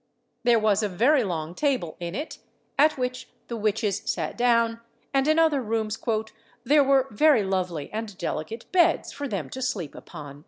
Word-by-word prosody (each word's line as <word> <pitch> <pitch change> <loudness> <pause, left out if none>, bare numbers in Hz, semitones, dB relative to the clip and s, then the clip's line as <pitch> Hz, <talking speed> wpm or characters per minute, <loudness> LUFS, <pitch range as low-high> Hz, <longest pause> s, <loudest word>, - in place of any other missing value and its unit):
There 240 -1 +4
was 215 -1 +2
a 210 - 0
very 245 +9 +3
long 165 -4 -3
table 255 - -1
in 175 +1 -5
it, 295 +4 -5 0.4
at 305 +1 +4
which 250 0 -3 0.2
the 235 - -3
witches 215 -2 0
sat - - -2
down; 230 -1 +2 0.3
and 270 +1 +2
in 310 +1 +3
other 315 -4 +3
rooms 220 -1 -2 0.6
"there 285 +4 +5
were 270 -1 +4
very 250 +1 +4
lovely 180 -5 -2
and 215 -3 -5
delicate 200 +5 -4
beds 345 -2 +3
for 285 0 -5
them 195 - -3
to 260 - -6
sleep 185 - -2
upon." 145 -4 -10
225 Hz, 170 wpm, -25 LUFS, 190-270 Hz, 0.6 s, there